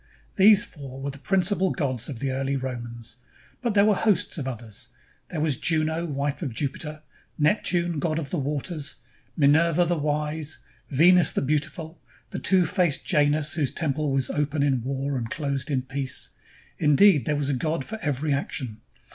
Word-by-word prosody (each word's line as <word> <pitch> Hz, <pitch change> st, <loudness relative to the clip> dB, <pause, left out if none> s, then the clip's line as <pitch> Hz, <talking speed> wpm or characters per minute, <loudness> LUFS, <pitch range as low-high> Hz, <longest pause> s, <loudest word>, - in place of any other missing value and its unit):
These 205 Hz, +1 st, +7 dB
four 135 Hz, -4 st, -10 dB
were 140 Hz, +1 st, -3 dB
the 135 Hz, -, -12 dB
principal 190 Hz, +3 st, +2 dB
gods 130 Hz, -, -2 dB
of 135 Hz, -, -5 dB
the 135 Hz, +3 st, -2 dB
early 135 Hz, +1 st, -1 dB
Romans, 120 Hz, -3 st, -6 dB, 0.4 s
but 235 Hz, -4 st, -1 dB
there 200 Hz, 0 st, +6 dB
were 215 Hz, -, +5 dB
hosts 200 Hz, -3 st, +1 dB
of 135 Hz, -, -4 dB
others. 115 Hz, -4 st, -6 dB, 0.4 s
There 165 Hz, -, -4 dB
was 150 Hz, -4 st, +1 dB
Juno, 160 Hz, +1 st, 0 dB
wife 140 Hz, -1 st, -2 dB
of 135 Hz, -9 st, -4 dB
Jupiter; 150 Hz, +2 st, -3 dB, 0.3 s
Neptune, 170 Hz, 0 st, +1 dB
god 155 Hz, 0 st, -1 dB
of 150 Hz, -4 st, -4 dB
the 175 Hz, -, -1 dB
waters; 145 Hz, +2 st, -3 dB, 0.4 s
Minerva 165 Hz, +4 st, +4 dB
the 175 Hz, +1 st, +1 dB
wise; 150 Hz, +1 st, -2 dB, 0.3 s
Venus 170 Hz, +4 st, +5 dB
the -, -, -1 dB
beautiful; 155 Hz, +3 st, -2 dB, 0.3 s
the -, -, -4 dB
two 185 Hz, -1 st, +4 dB
faced 175 Hz, -4 st, 0 dB
Janus, 150 Hz, -3 st, +2 dB
whose 150 Hz, -5 st, 0 dB
temple 155 Hz, -2 st, -1 dB
was 135 Hz, -2 st, 0 dB
open 145 Hz, 0 st, 0 dB
in 135 Hz, -4 st, +1 dB
war 135 Hz, +2 st, -2 dB
and 115 Hz, -1 st, -5 dB
closed 140 Hz, -1 st, -3 dB
in 130 Hz, -3 st, 0 dB
peace 135 Hz, 0 st, -1 dB, 0.2 s
— -, -, -25 dB
indeed, 150 Hz, -, +5 dB
there 150 Hz, -, +2 dB
was 145 Hz, -1 st, -1 dB
a -, -, +1 dB
god 155 Hz, +2 st, -1 dB
for 220 Hz, 0 st, -6 dB
every 145 Hz, -1 st, 0 dB
action. 130 Hz, -5 st, -4 dB
150 Hz, 175 wpm, -25 LUFS, 135-165 Hz, 0.4 s, These